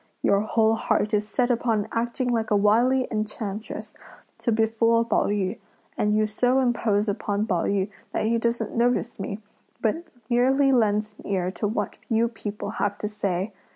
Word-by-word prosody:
Your 200 - +4
whole 220 +1 +2
heart 220 -1 0
is 210 0 +1
set 250 +1 +1
upon 225 -3 0
acting 240 +2 -1
like 225 -2 0
a 210 - +3
wily 235 +6 +3
enchantress 215 -1 -4 0.5
to 235 - 0
befool 230 +1 +2
Pao - - +1
yü; 200 0 -1 0.4
and 210 0 +1
you 215 - +3
so 245 +5 +2
impose 225 -4 +1
upon 205 0 -1
Pao 180 -6 0
yü 195 -1 +1 0.2
that - - -1
he 230 +1 +2
doesn't 235 -1 -1
notice 240 -1 +1
me, 200 +2 -5 0.4
but 240 +10 0 0.2
merely 265 +3 +3
lends 215 -3 +2
an - - -11
ear 185 -2 0
to 210 - -2
what 215 - -3
you 230 0 +3
people 205 -2 -5
have 205 0 0
to 210 - -3
say! 200 -1 -2
220 Hz, 170 wpm, -25 LUFS, 205-235 Hz, 0.5 s, Your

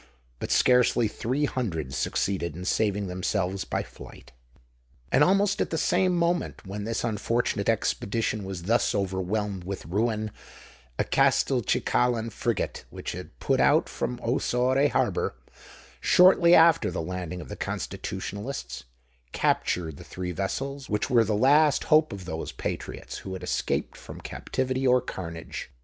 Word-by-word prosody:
But - - -4
scarcely 125 -2 +4
three 130 +7 -1
hundred 80 - -3
succeeded 85 +1 -1
in 90 +2 -7
saving 105 0 +1
themselves 95 +1 -2
by - - -2
flight. - - -13 0.8
And 140 - +5
almost 195 +3 +3
at - - 0
the 165 - -2
same 185 +2 +2
moment 170 -8 -1
when 100 +2 -5
this 115 0 -2
unfortunate 115 -1 0
expedition 110 -1 0
was 95 -3 -6
thus 115 +5 +2
overwhelmed 95 0 -2
with 95 +2 -6
ruin, 110 +3 -1 0.7
a - - +2
Castelcicalan 115 -2 +2
frigate, 115 0 -2
which - - -6
had - - -9
put - - +1
out - - +4
from 60 - -3
Ossore 130 +3 +2
harbour, 65 - 0 0.6
shortly 180 -1 +6
after 165 0 +5
the - - -4
landing 90 +1 -4
of 85 - -8
the - - -5
Constitutionalists, 95 - -5 0.5
captured 80 -5 0
the - - -10
three 90 -1 -5
vessels 135 - -4
which 105 - -1
were 120 -2 +6
the 105 -1 0
last 145 +5 +4
hope 155 0 +4
of 95 -2 -7
those 80 -2 -4
patriots - - -5
who 95 - -7
had 95 -1 -7
escaped - - -1
from - - -10
captivity 130 0 -2
or 125 0 +5
carnage. 85 -8 -7
105 Hz, 140 wpm, -27 LUFS, 95-130 Hz, 0.8 s, shortly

